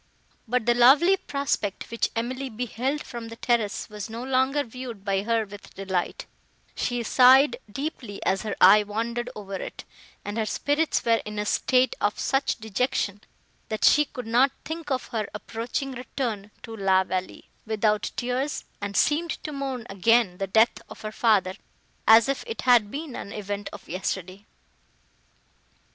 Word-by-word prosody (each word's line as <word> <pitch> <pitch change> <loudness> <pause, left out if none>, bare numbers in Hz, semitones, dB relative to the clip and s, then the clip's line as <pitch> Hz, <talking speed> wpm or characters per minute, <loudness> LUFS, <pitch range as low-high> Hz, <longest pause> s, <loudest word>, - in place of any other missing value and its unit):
But 245 0 0
the 240 - +4
lovely 275 +10 +6
prospect, 280 - -3
which 230 - 0
Emily 255 +4 -3
beheld 250 +5 -3
from 235 -1 -7
the 230 - -8
terrace, 230 -4 0
was 210 0 -7
no 230 +2 -6
longer 265 +2 +1
viewed 240 -4 -8
by 195 -1 +1
her 225 +1 0
with 205 0 -13
delight; 190 -2 -2 0.5
she 245 -1 -2
sighed 255 +3 +6
deeply 265 -5 -5
as 190 0 +1
her 215 - -3
eye 200 +3 +8
wandered 230 +3 -3
over 200 -2 -8
it, 190 - -6 0.4
and 205 +2 -3
her 220 - +1
spirits 295 +7 0
were 230 -1 +3
in 210 0 -7
a 210 - -1
state 255 +4 +2
of 205 - +1
such 270 0 0
dejection, 215 -2 -2 0.5
that 215 - 0
she 300 - +6
could 250 -4 -8
not 245 +5 +4 0.2
think 320 -1 -5
of 260 -2 -2
her 215 -3 -3
approaching 230 +5 -4
return 240 -5 -4
to 225 - -7
La 190 -2 +3
Vallée, 185 0 -4 0.2
without 215 -1 +1
tears, 255 +4 -2 0.2
and 200 0 -3
seemed 325 +3 +2
to 305 - -4
mourn 270 -4 -4
again 195 -1 +2
the 195 - -1
death 220 +5 +3
of - - -11
her 215 - -5
father, 210 -5 +2 0.5
as 225 +2 +8
if 275 0 -1
it 455 - -4
had 240 -5 +5
been 290 +1 -6
an 200 - -7
event 205 -1 -4
of - - -11
yesterday. 185 +2 -4
230 Hz, 160 wpm, -26 LUFS, 205-260 Hz, 0.5 s, eye